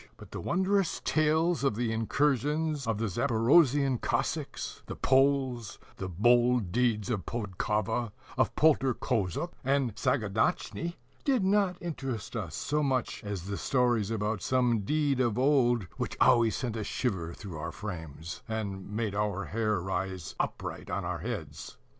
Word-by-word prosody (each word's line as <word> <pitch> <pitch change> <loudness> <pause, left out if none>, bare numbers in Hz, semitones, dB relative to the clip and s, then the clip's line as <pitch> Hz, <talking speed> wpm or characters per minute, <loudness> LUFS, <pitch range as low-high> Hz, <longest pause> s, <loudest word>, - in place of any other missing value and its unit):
But - - -13
the - - -5
wondrous 190 0 +1
tales 160 +1 +2
of 135 -6 +2
the 115 0 -1
incursions 145 +4 0
of 115 -2 0
the 115 - -1
Zaporozhian 125 - +3
Cossacks, - - -2
the - - -5
Poles, 130 -4 +2 0.2
the 95 - -4
bold 120 +2 +3
deeds 120 -1 +1
of 100 -7 -2
Podkova, 110 +1 -1 0.2
of - - +1
Poltor 135 -5 +4
Kozhukh, 115 - -1
and 135 -3 +1
Sagaidatchnii, 130 - 0 0.3
did 260 -7 +2
not 190 -2 +2
interest 135 -10 -5
us 95 -9 -4
so 150 +2 0
much 130 -4 -1
as 100 -4 -4
the 100 +1 -4
stories 120 -5 +1
about 110 -1 -1
some 125 -3 +2
deed 145 +5 +1
of 120 -4 +1
old 125 -4 +3
which - - -3
always 115 -2 +5
sent 120 -4 -3
a 110 - -2
shiver 95 -9 -2
through 90 -7 -8
our 75 - -4
frames, 80 -5 -7
and 100 -4 -4
made 105 -1 -2
our 100 -1 -1
hair 110 -3 0
rise 95 -2 -3
upright - - -3
on - - -2
our - - -2
heads. - - -6
120 Hz, 145 wpm, -30 LUFS, 105-140 Hz, 0.3 s, always